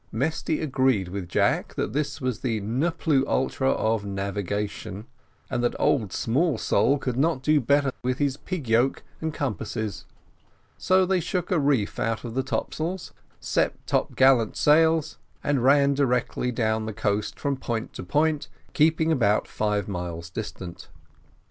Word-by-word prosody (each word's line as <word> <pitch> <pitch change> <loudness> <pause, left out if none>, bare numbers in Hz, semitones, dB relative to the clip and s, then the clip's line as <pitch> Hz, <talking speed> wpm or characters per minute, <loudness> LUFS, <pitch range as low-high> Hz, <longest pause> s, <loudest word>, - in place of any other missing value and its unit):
Mesty 155 +5 -1
agreed 130 - +1
with 90 -2 -5
Jack - - +1
that - - -2
this 150 +1 -2
was 130 -5 -2
the 115 -4 -1
ne 120 +11 0
plus 150 -5 +1
ultra 135 0 0
of 110 -4 +1
navigation: 100 +1 -4 0.4
and 120 -2 -2
that 120 - +1
old 110 -8 +2
Smallsole 140 - +1
could 125 -2 -3
not 140 -2 +1
do 150 0 +3
better 140 +2 +2
with 130 0 -1
his 140 -2 0
"pig 155 -2 -5
yoke" 120 +4 +2 0.2
and 160 0 -1
compasses. 110 - -4 0.7
So 185 0 +3
they 190 0 +2
shook 180 +2 -2
a 180 - +3
reef 140 -8 +1
out 115 0 -1
of 120 -2 -6
the 130 - +1
top - - -3
sails, 175 +4 -4 0.3
set - - +1
top - - 0
gallant 130 -4 +4
sails, 160 0 +3 0.2
and 140 -4 +1
ran 140 +1 +5
directly 125 -2 0
down 110 -2 0
the 110 - -4
coast 105 0 -1
from 140 -1 0
point 115 -3 -4
to - - -6
point, 150 - +1 0.3
keeping 160 +1 +3
about 110 -8 +2
five 105 -2 -1
miles 85 -3 -5
distant. 90 -5 -7
130 Hz, 155 wpm, -25 LUFS, 110-145 Hz, 0.7 s, ran